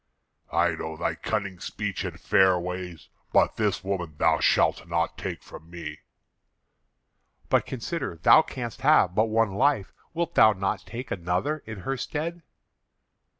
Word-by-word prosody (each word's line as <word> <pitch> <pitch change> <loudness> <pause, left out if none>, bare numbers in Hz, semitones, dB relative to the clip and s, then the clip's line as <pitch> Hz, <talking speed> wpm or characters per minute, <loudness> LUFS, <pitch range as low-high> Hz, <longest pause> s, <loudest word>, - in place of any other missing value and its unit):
"I - - +3
know 80 0 -5
thy - - -1
cunning 100 -4 -3
speech 100 +2 -4
and - - -6
fair 95 -1 +4
ways; 90 -1 -6 0.2
but - - +3
this 105 -3 0
woman 90 -5 -3
thou - - +3
shalt - - +2
not 85 0 -1
take - - -6
from 80 - -12
me." 85 -1 -7 1.5
"But - - +2
consider; 130 - -4
thou 85 - +6
canst 120 -6 -6
have 135 - +4
but 110 +3 +3
one 110 -2 +2
life. 130 -3 +1 0.2
Wilt 170 -1 -1
thou 110 0 +6
not 95 0 -3
take 120 +3 -7
another 95 - -1
in 110 -4 -7
her 135 +7 -2
stead?" 165 +6 -4
100 Hz, 150 wpm, -26 LUFS, 90-125 Hz, 1.5 s, thou